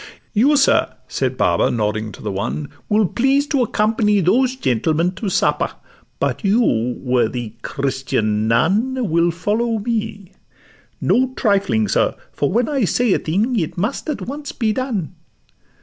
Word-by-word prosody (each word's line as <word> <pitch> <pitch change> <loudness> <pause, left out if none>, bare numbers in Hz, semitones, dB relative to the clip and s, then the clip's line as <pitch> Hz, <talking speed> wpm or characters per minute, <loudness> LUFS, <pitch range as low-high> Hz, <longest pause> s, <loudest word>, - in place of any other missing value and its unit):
'You, 270 +7 +4
sir,' 270 - +3
said - - -2
Baba, - - +2
nodding 110 -1 -1
to - - -12
the 105 - -2
one, 100 +9 -3 0.2
'Will 210 -1 +3
please 270 - +2
to 280 -3 0
accompany 210 -2 +2
those 245 +9 +2
gentlemen 160 - +1
To 200 +2 -4
supper; 190 - +1 0.5
but - - -1
you, 195 - +2
worthy 120 -3 -1
Christian 125 -7 -1
nun, 205 - +1
Will 170 +1 +3
follow 215 +7 -1
me: 215 -3 -3 0.7
no 255 +1 +2
trifling, 200 - +1
sir; - - +1 0.2
for 140 - -1
when 235 +5 +1
I 280 -5 0
say 225 +2 +2
a - - +1
thing, 215 +9 0
it 160 -1 -3
must 220 - -2
at 300 - -3
once 285 +2 -6
be 220 -3 0
done. 220 - -3
205 Hz, 150 wpm, -19 LUFS, -, 0.7 s, You